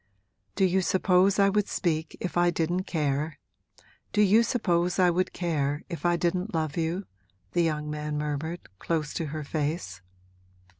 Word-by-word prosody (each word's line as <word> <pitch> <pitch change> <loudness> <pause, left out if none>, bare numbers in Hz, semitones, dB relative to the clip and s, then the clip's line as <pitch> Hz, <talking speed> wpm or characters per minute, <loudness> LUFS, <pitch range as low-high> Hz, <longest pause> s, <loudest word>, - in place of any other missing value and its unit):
'Do 195 - +3
you 190 +1 +2
suppose 185 +1 +3
I 200 -1 +5
would 210 0 +1
speak 160 -2 -1
if 180 - -4
I 175 0 +4
didn't 175 +2 -1
care 150 -1 -1 0.7
do 210 - +4
you 210 +3 +6
suppose 180 -7 +1
I 180 -2 +5
would 185 +2 0
care 150 -4 -1
if 170 +1 -2
I 175 - +3
didn't 180 +3 -1
love 155 -2 -1
you?' 170 +4 -1 0.5
the 175 - +2
young 150 -2 0
man 150 0 -3
murmured, 150 +3 -3 0.2
close 155 -3 -2
to 165 - -2
her 155 +1 -4
face. 145 - -3
170 Hz, 160 wpm, -27 LUFS, 150-185 Hz, 0.7 s, you